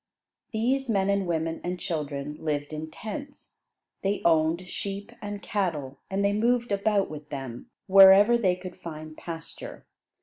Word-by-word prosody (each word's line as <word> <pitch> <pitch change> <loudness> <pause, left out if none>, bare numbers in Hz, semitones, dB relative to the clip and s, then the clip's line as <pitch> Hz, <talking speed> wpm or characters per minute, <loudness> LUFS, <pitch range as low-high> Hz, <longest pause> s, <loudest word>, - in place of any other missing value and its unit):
These 255 +4 0
men 200 -2 +2
and 200 -2 0
women 165 -1 -1
and 180 +1 -3
children 150 -3 -3
lived 150 -1 -2
in 155 +1 -5
tents. 280 - -8 0.4
They 200 +1 -1
owned 165 +2 +3
sheep 200 +3 -5
and 205 0 -6
cattle, 155 -10 -2
and 195 +1 0
they 200 - +3
moved 240 +2 +1
about 200 0 +2
with 150 -1 -9
them, 135 -4 -6 0.2
wherever 195 +3 +8
they 190 -6 +2
could 185 0 -9
find 155 -1 -8
pasture. 165 -1 -8
185 Hz, 145 wpm, -27 LUFS, 155-205 Hz, 0.4 s, wherever